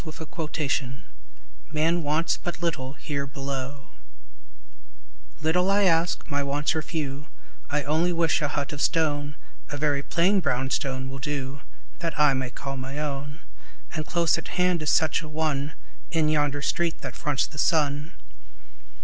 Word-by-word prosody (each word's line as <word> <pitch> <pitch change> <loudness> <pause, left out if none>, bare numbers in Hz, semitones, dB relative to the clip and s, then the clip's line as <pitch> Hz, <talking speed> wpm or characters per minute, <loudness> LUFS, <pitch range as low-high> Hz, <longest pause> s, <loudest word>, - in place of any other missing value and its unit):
CONTENTMENT 155 -4 -3 0.7
"Man 160 +3 +2
wants 155 +2 +2
but 175 - -5
little 145 -6 -1
here 140 -2 -3
below" 135 0 -5 1.5
LITTLE 180 +4 +3
I 200 +1 +4
ask; 170 -2 +3
my 145 -2 0
wants 145 +3 +1
are 160 - +1
few; 150 -2 -4 0.4
I 150 0 +1
only 160 +5 +2
wish 165 -1 +2
a 150 - +2
hut 145 0 -2
of 145 - -4
stone, 145 -2 +1 0.3
(A 145 - -4
very 145 -1 +2
plain 180 +7 +3
brown 135 -5 0
stone 130 -1 0
will 135 +1 -6
do,) 140 -1 -3 0.4
That 165 -3 -2
I 150 -2 +6
may 130 -1 -1
call 135 +2 -5
my 135 +2 -5
own; 145 0 -3 0.5
And 155 -2 -1
close 170 +1 +2
at - - -8
hand 180 -2 +3
is 155 - 0
such 160 0 +3
a 155 - -8
one, 150 -2 -1 0.3
In 160 -2 +2
yonder 145 -2 +1
street 170 +1 0
that - - -5
fronts 145 -4 +1
the 150 - -8
sun. 150 0 +2
150 Hz, 155 wpm, -26 LUFS, 140-165 Hz, 1.5 s, I